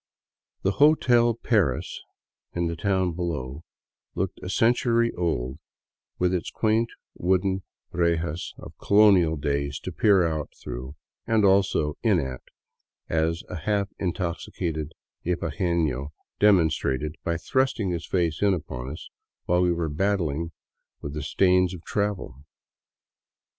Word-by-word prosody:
The 95 - +3
" - - -2
Hotel 120 -6 +5
Paris," 100 - 0 0.5
in 85 0 0
the 85 0 -2
town 95 0 +1
below, 80 -5 -4 0.5
looked 95 +1 -2
a 90 - -6
century 115 +3 +2
old 70 -6 -2 0.6
with 90 0 +1
its 90 - -1
quaint 115 +1 +1 0.2
wooden 95 +1 +1 0.3
rejas 85 -1 -1
of - - -11
colonial 100 -6 +5
days 70 -1 -2
to - - -5
peer 100 -4 +4
out 80 -2 -3
through 65 +4 -7 0.2
— - - -49
and 110 -2 +3
also 95 -6 +2
in 105 -6 +3
at, 65 -4 -4 0.7
as 80 +1 0
a 90 - -5
half 100 +4 0
intoxicated 85 -3 -3 0.3
ibaguefio 80 -5 -1 0.3
demonstrated 80 -7 +2
by 85 0 0
thrusting 120 -1 0
his 85 -2 -4
face 85 -4 0
in 100 -2 +4
upon 65 -6 -6
us 75 - -8 0.4
while 90 0 +2
we 90 -1 +3
were 85 -1 -1
battling 85 -1 -1 0.5
with 70 - -6
the 75 - -4
stains 90 +4 +2
of 85 - -12
travel. 100 - -3
85 Hz, 130 wpm, -26 LUFS, 80-100 Hz, 0.7 s, Hotel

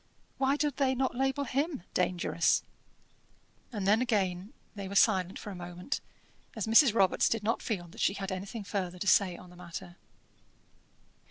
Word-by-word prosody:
Why 270 +1 +3
do 295 0 +1
they 265 -1 +1
not 260 +1 0
label 270 +3 0
him 280 - -2
'dangerous'?" 175 -2 +1 1.1
And 205 -5 -3
then 215 +4 +4
again 200 -5 0 0.2
they 200 -2 -6
were 200 - -6
silent 190 -3 +3
for 205 - -7
a - - -7
moment, 180 +7 -5 0.5
as 220 - -2
Mrs. 230 +4 +6
Robarts 190 -4 +3
did 225 -2 -1
not 230 +2 0
feel 185 -6 -3
that - - -9
she 195 - +2
had 195 -1 -4
anything 195 +4 -5
further 185 -3 -3
to 200 - -4
say 185 -4 +4
on 180 -1 -13
the - - -15
matter. 175 0 -9
200 Hz, 170 wpm, -30 LUFS, 180-245 Hz, 1.1 s, Mrs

